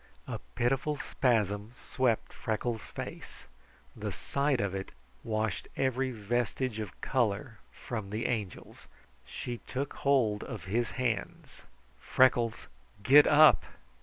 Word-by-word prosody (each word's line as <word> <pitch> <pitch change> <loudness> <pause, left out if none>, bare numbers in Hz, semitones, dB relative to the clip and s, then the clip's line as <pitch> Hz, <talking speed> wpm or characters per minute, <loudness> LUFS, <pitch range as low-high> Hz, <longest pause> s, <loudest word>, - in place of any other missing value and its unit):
A - - -4 0.2
pitiful 135 +5 +1
spasm 110 -5 0
swept 125 -4 0
Freckles' 110 +1 -2
face. - - -8 0.5
The - - -4
sight 140 -2 0
of 100 -3 -1
it 95 0 -4 0.3
washed 110 -3 -2
every 130 0 +1
vestige 120 +1 -2
of 105 - -6
color 115 -2 -1
from 110 -5 -6
the 110 +3 -3
Angel's. 105 -7 -4 0.4
She 120 -1 -5
took 135 +2 -3
hold 120 -7 +2
of 115 -6 -7
his 110 +5 -1
hands. 125 -3 -3 0.3
"Freckles, 120 -3 +2 0.4
get 145 +5 +8
up!" 155 +1 +7
120 Hz, 115 wpm, -30 LUFS, 110-130 Hz, 0.5 s, get